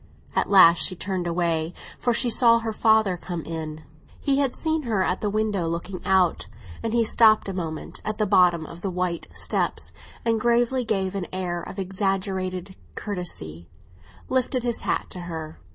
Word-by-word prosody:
At - - +1
last 175 -4 +7
she 185 - +1
turned 185 -1 -3
away, 170 -1 0 0.2
for 245 - +1
she 240 +2 +2
saw 230 0 +5
her 225 -1 -3
father 220 -4 +3
come 175 -2 -5
in. 155 -1 -6 0.4
He 275 -1 +1
had 270 -3 +1
seen 320 -1 0
her 220 -8 0
at 180 0 -1
the 210 - 0
window 210 -4 0
looking 170 +3 -4
out, 185 -2 +2 0.3
and 225 - -2
he 235 0 +3
stopped 220 -1 +4
a 195 - -3
moment 160 -4 -5
at 215 0 -3
the 215 - +1
bottom 180 -5 +4
of 170 +2 -10
the 195 - -2
white 180 -2 -2
steps, - - -1 0.3
and 225 -1 +1
gravely, 240 +1 +2
with 190 -3 0
an 195 -3 -3
air 180 -2 -2
of 190 - -9
exaggerated 190 -1 -2 0.2
courtesy, 85 - -5 0.6
lifted 255 -1 0
his 240 -2 -1
hat - - -1
to 180 - -5
her. 160 -3 -6
190 Hz, 175 wpm, -25 LUFS, 175-220 Hz, 0.6 s, last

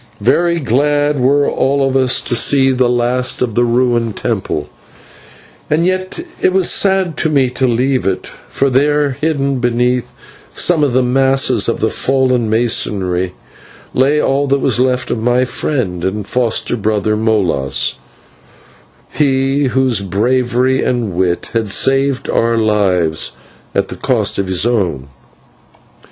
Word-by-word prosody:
Very 170 +9 +2
glad 145 +2 +1
were 140 +3 +2
all 135 0 0
of 135 - -2
us 130 -1 +2
to 120 - -2
see 135 +2 +3
the 125 -1 +1
last 125 +1 0
of 120 -3 -3
that 120 - +2
ruined 120 -2 0
temple, - - -3 1.0
and 160 +3 +1
yet 185 - -2 0.2
it - - +3
was 190 -2 +2
sad 190 -4 +1
to 160 - +1
me 135 -4 +1
to 130 +1 0
leave 125 +1 0
it, 95 - -2 0.2
for 140 0 0
there, 145 +2 +2
hidden 140 -1 -1
beneath 125 0 0 0.4
some 165 -4 +1
of 140 -4 +1
the 130 +1 +2
masses 135 +2 +2
of - - -3
the - - +1
fallen 130 -4 0
masonry, 95 -5 0 0.6
lay 140 +4 +2
all 140 0 0
that 140 +1 +2
was 130 - 0
left 125 0 0
of 120 - -2
my 125 +3 +1
friend 115 - -3
and 100 +2 -3
foster 120 0 -1
brother, 105 -1 -1
Molas, 100 -11 0 1.1
he 135 -1 +1
whose 130 -5 +1
bravery 125 +6 0
and 120 -6 -1
wit 90 0 -1
had 115 -2 -1
saved 135 +5 +1
our 115 0 +1
lives 95 -7 +1 0.4
at - - 0
the - - -7
cost 110 -5 -1
of 100 - -1
his 95 +2 +1
own. 90 - -1
125 Hz, 145 wpm, -15 LUFS, 110-135 Hz, 1.1 s, see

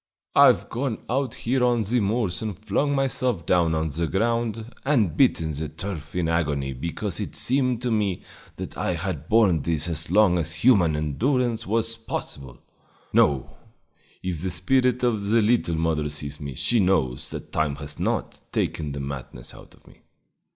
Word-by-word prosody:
I've - - +6
gone 125 -2 -3
out 130 -2 0
here 125 +2 0
on 120 -2 +3
the 120 +5 +1
moors 105 -3 0
and 105 -5 -4
flung 110 +8 0
myself 130 - 0
down 85 -3 +3
on 80 0 0
the 80 +3 -2
ground 115 - -1
and 115 - +2
bitten 80 - +2
the 75 +1 -4
turf 80 -2 -7
in 90 -2 0
agony 75 -5 0
because 85 +7 -4
it - - -5
seemed 125 -2 0
to 125 - 0
me 105 -4 0 0.3
that - - -7
I 90 - -1
had 85 -3 -4
borne 105 -8 +4
this 80 +1 0
as 80 -1 -2
long 95 -2 +4
as 85 +1 -2
human 90 -11 +4
endurance 115 - 0
was 115 +2 +1
possible! 70 - -6 0.6
No; 70 -3 +2 0.7
if 90 -4 -3
the 95 - -1
spirit 125 +7 +1
of 110 -5 +1
the 115 +2 +4
little 110 -6 +2
mother 80 -2 0
sees 75 0 -5
me, 70 -2 -5
she 120 - +1
knows 80 -11 +1
that - - -8
time 75 -2 0
has 75 0 -6
not - - -2
taken 75 -3 -2
the 70 - -5
madness 65 -3 -7
out - - -15
of - - -27
me!" - - -19
95 Hz, 170 wpm, -25 LUFS, 80-115 Hz, 0.7 s, I've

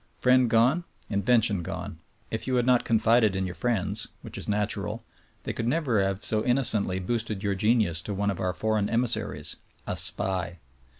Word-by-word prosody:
Friend 125 -1 +4
gone 125 +10 +3
— - - -28
invention 105 -1 +3
gone. 80 -1 -6 0.3
If - - -3
you 130 - 0
had 120 -1 +2
not 125 -1 +3
confided 110 -2 +3
in 95 0 -1
your 90 - -5
friends' 105 -2 -2 0.2
(which - - -9
is - - -6
natural) 105 +1 -2 0.4
they - - -4
could 115 - -3
never 125 -6 +1
have 95 +1 -1
so 110 -1 +1
innocently 115 -7 +2
boosted 110 +1 -3
your 100 -1 0
genius 105 -4 +1
to 100 - -5
one 100 +1 0
of 95 - -6
our 90 - 0
foreign 110 -2 0
emissaries, 110 -9 -1 0.3
a— - - -3
SPY! 90 -2 0
110 Hz, 180 wpm, -26 LUFS, 95-120 Hz, 0.4 s, Friend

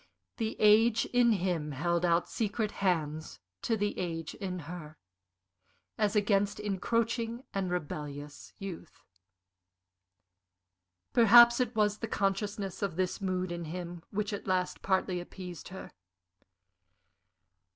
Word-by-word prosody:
The 225 -2 -2
age 220 +2 +5
in 245 -1 +3
him 175 -6 -1
held 170 +5 0
out 170 0 +2
secret 215 -1 -1
hands 160 -5 -1 0.2
to 225 - 0
the 205 0 -1
age 165 -3 -3
in 185 -3 -5
her 155 -2 -8 1.0
as 210 0 +1
against 205 -1 +2
encroaching 230 +4 -1
and 195 -2 -1
rebellious 150 -4 -5
youth. 185 -4 -8 2.1
Perhaps 235 +1 +8
it 245 -2 0
was 210 -1 +2
the 225 - -3
consciousness 200 -1 -2
of 195 -5 -1
this 185 +2 -1
mood 185 -1 -1
in 170 -1 -4
him 175 +1 -6
which 210 +1 -2
at 200 - -5
last 185 -1 0
partly 190 -2 0
appeased 180 -1 -8
her. 190 +1 -9
190 Hz, 120 wpm, -31 LUFS, 175-215 Hz, 2.1 s, Perhaps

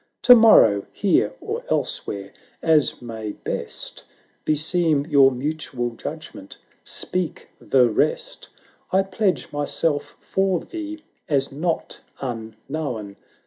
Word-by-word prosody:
To 250 - +10
morrow, 165 - +6
here, - - +1
or - - -4
elsewhere, 100 -1 -2 0.3
as 155 -6 +2
may 110 -3 -5
best - - -4 0.4
Beseem 155 -1 +2
your 140 -4 +6
mutual 130 -2 -3
judgment, 145 -5 -8 0.3
speak 180 -2 -3
the 125 -2 +4
rest; - - -1 0.4
470 190 - +2
I - - +5
pledge 190 -11 0
myself 145 +1 -1
for 190 -2 0
thee, 315 -2 -7 0.3
as 140 -2 +1
not 160 +4 -3 0.2
unknown 120 -4 -4 0.2
398 135 - -9
LARA 125 -9 -3
[Canto - - -30
i. - - -36
150 Hz, 125 wpm, -23 LUFS, 125-180 Hz, 0.4 s, To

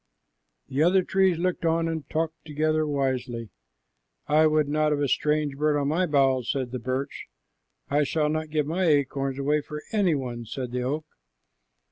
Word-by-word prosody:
The 135 - -1
other 185 +3 +4
trees 190 -2 +2
looked 180 +1 -1
on 165 0 +2
and 160 -4 -4
talked 160 +1 -2
together 155 0 0
wisely. 130 -5 -2 0.7
"I 155 +1 +4
would 155 -1 +2
not 150 +1 +1
have 145 -1 +1
strange 150 -2 +1
birds 150 +1 +1
on 140 0 0
my 175 +4 +1
boughs," 135 -4 +2
said 130 -3 -1
the 125 - -3
birch. 130 +3 -4 0.6
"I 145 +1 +2
shall 150 +1 0
not 155 0 -2
give 150 -1 0
my 175 +5 0
acorns 140 -3 +1
away 145 +2 +1
for 150 +1 -8
any 200 -7 +2
one," 120 -4 -4
said 125 +2 -5
the 125 0 -2
oak. 145 +5 -2
150 Hz, 170 wpm, -26 LUFS, 135-155 Hz, 0.7 s, other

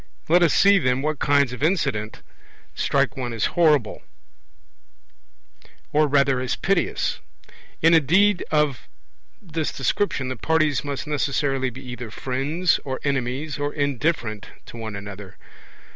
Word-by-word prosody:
Let 175 +3 +4
us 170 -3 +4
see, 200 0 +5
then, 130 -3 0
what 155 -1 -1
kinds 140 -3 +2
of 125 - -8
incident 140 - -1 0.5
strike - - 0
one 125 -3 -4
as 115 - 0
horrible, 150 -9 +2 1.9
or 150 0 +4
rather 140 -2 +2
as 125 -1 -2
piteous. 195 -2 0 0.6
In 165 +1 +6
a 165 - +8
deed 185 +6 +3
of 150 - 0 0.5
this 165 -5 -3
description 135 - -1
the 130 - -3
parties 155 +2 +1
must 140 -3 -4
necessarily 140 -2 0
be 130 +2 -11
either 125 -2 -7
friends, 140 +10 0
or 130 -2 -4
enemies, 140 +2 -2
or 145 0 -1
indifferent 140 -6 -1 0.2
to - - -12
one 110 -2 -6
another. 100 -1 -9
140 Hz, 135 wpm, -23 LUFS, 125-155 Hz, 1.9 s, a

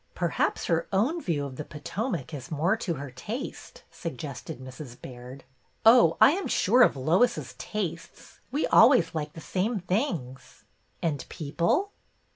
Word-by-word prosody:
" - - -38 0.2
Perhaps - - 0
her 165 -1 0
own 250 - +1
view 150 - -1
of 130 -2 -8
the 150 - -4
Potomac 160 - -4
is 135 -4 -7
more 165 +6 +1
to 195 -7 -3
her 140 -1 -7
taste," 235 - -7
suggested 140 -6 -7
Mrs. 130 -1 -10
Baird. 125 +1 -10 0.2
" - - -40
Oh, 235 +2 +7
I - - +8
am 380 +4 -2
sure 240 +6 +3
of 195 - +5
Lois's 185 - +1
tastes. 185 -6 -6
We 290 +4 0
always 230 -7 +5
like 150 -2 -4
the 160 - -9
same 205 +6 -1
things." 180 - -3 0.2
" - - -41
And 155 -4 -1
people?" 170 - 0
170 Hz, 160 wpm, -27 LUFS, 140-225 Hz, 0.2 s, I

